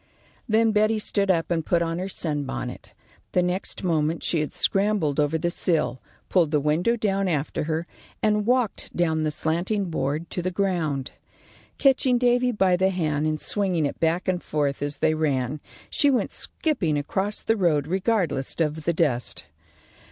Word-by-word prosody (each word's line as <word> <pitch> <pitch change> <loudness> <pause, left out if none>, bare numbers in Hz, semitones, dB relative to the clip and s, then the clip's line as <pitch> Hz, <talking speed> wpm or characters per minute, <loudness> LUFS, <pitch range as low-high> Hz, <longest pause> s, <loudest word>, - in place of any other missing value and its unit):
Then 220 +1 +4
Betty 215 +1 +3
stood 200 -2 -1
up 165 -3 +1
and 165 -2 +1
put 170 +1 +2
on 165 +1 -2
her 190 +2 -3
sunbonnet. 145 - -4 0.4
The 180 - +3
next 180 +2 -3
moment 160 -2 0
she 165 - +1
had 150 - -2
scrambled 195 -8 +1
over 150 +2 +2
the 175 +2 -1
sill, 130 -9 0 0.3
pulled 175 -5 +3
the 150 -1 +2
window 155 +10 +1
down 195 -3 0
after 150 -2 -1
her, 160 +1 -2 0.4
and 210 0 +2
walked 245 -3 0
down 160 -2 +1
the 155 - +1
slanting 175 +5 -1
board 155 +2 -2
to 180 - -2
the 185 - -1
ground. 175 -8 -1 0.7
Catching 265 -2 +3
Davy 245 0 +3
by 190 -5 +3
the 190 +1 +2
hand, 155 -5 0
and 155 0 -1
swinging 185 -6 +1
it 140 - -3
back 165 +3 +1
and 180 -1 0
forth 145 -3 -1
as 145 0 -1
they 155 - +2
ran, 145 -3 -1 0.3
she 285 - +3
went 260 -3 +1
skipping 175 - -1
across 190 +8 -1
the 225 - +2
road 165 -8 +2
regardless 185 - 0
of 155 -1 -1
the 170 - +2
dust. 140 -7 0
170 Hz, 170 wpm, -25 LUFS, 150-200 Hz, 0.7 s, Then